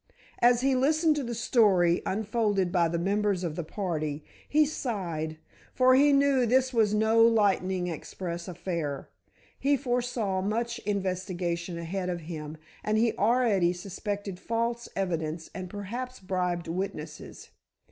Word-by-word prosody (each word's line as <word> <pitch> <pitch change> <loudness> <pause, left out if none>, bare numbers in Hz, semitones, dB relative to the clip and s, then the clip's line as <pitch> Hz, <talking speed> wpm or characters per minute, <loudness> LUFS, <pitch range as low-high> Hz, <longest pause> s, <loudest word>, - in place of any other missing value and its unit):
As 240 0 +5
he 270 +1 +3
listened 305 +4 +3
to 290 - -1
the 235 -1 -4
story 195 -7 +3
unfolded 205 -2 0
by 175 -2 +3
the 170 +1 -1
members 200 +1 0
of 165 -3 -3
the 175 - -3
party, 155 -5 -3 0.2
he 305 +1 +4
sighed, 175 - -3 0.4
for 255 0 +5
he 285 +3 +6
knew 275 -3 +3
this 260 +2 +2
was 220 -3 +3
no 220 +2 +3
lightning 195 -5 +3
express 170 +1 -5
affair. 170 -5 -4 0.5
He 280 +1 +3
foresaw 245 -7 -1
much 235 +4 -1
investigation 180 -3 -2
ahead 180 +2 -3
of 175 -1 -3
him, 155 -1 -7 0.3
and 215 0 +1
he 230 +1 +3
already 210 -5 +2
suspected 195 +1 -5
false 235 +1 -2
evidence 165 -4 -2
and 185 -1 -6
perhaps 235 +6 -6
bribed 180 -2 -2
witnesses. 165 -3 -6
195 Hz, 135 wpm, -28 LUFS, 175-235 Hz, 0.5 s, he